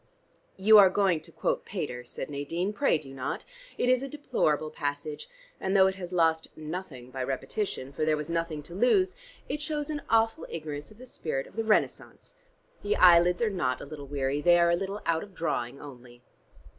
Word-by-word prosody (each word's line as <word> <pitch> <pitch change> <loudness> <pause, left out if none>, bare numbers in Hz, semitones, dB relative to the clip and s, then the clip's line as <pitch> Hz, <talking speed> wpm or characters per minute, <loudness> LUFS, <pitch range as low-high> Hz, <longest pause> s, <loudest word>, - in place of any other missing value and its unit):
"You 210 +3 +8
are 195 -2 +8
going 185 -4 +2
to 165 +1 -15
quote - - -1
Pater," 145 -11 -5
said 120 - -6
Nadine. 165 +7 -3
"Pray 275 - +2
do 135 -3 -11
not: 130 -1 -4 0.3
it - - +1
is 255 0 +4
a 275 - -5
deplorable 155 - 0
passage, 145 0 -4 0.3
and 190 +1 +1
though 190 - +7
it 190 - +2
has 185 -2 -8
lost 165 -2 +2
nothing 155 -6 -7
by 130 0 -3
repetition 135 +1 -3
for 145 - -2
there 155 0 +2
was 150 0 -5
nothing 165 -3 -2
to 170 - -12
lose 250 - +3 0.3
it 300 - -3
shows 300 -1 -3
an 295 -1 -3
awful 225 +6 +2
ignorance 150 -2 -6
of 215 - -17
the 255 - -11
spirit 145 - -4
of - - -17
the 225 - -1
Renaissance. 220 - 0 0.5
The 420 - 0
eyelids 175 +3 +6
are 220 - +1
not 130 -10 -1
a - - -7
little 145 -1 -9
weary: 140 0 -1
they 175 +2 +6
are 170 0 +4
a - - +4
little 195 +3 -4
out 165 -1 +1
of 200 -3 -11
drawing 140 -6 -2
only." 125 -3 -12
170 Hz, 200 wpm, -28 LUFS, 145-205 Hz, 0.5 s, You